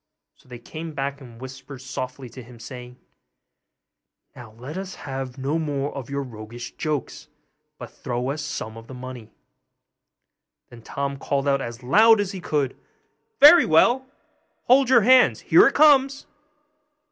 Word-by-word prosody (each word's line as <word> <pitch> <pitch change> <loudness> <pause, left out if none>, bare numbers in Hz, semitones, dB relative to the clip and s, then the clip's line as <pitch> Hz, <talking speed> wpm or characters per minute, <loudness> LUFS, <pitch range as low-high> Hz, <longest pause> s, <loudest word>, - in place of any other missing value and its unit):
So - - -27
they 125 - -9
came 155 +6 -9
back 140 +1 -4
and 120 -3 -14
whispered 130 +2 -10
softly 130 0 -7
to 130 +3 -11
him, 120 0 -15
saying, 125 +1 -10 1.4
'Now 120 -3 -13
let 125 +7 -10
us 190 0 -6
have 135 -2 -7
no 140 +5 -2
more 145 -2 -3
of 135 -4 -7
your 140 0 -3
roguish 120 -1 -10
jokes; 150 -4 -5 0.5
but - - -10
throw 125 +2 -4
us 150 +2 -5
out - - -6
some 110 +1 -6
of 115 0 -13
the 130 - -10
money.' 125 -3 -10 1.4
Then 120 -1 -13
Tom 140 +3 -5
called 140 +1 -2
out 140 -1 +1
as 120 0 -8
loud 215 - +5
as 200 -2 -2
he 190 -3 -8
could, 145 -5 -2 0.6
'Very 305 +3 +8
well! 240 +11 +3 0.6
hold 260 +1 +3
your 245 -3 +6
hands! 255 +4 +4
here - - +5
it - - -1
comes. 275 -2 +4
135 Hz, 160 wpm, -23 LUFS, 125-165 Hz, 1.4 s, Very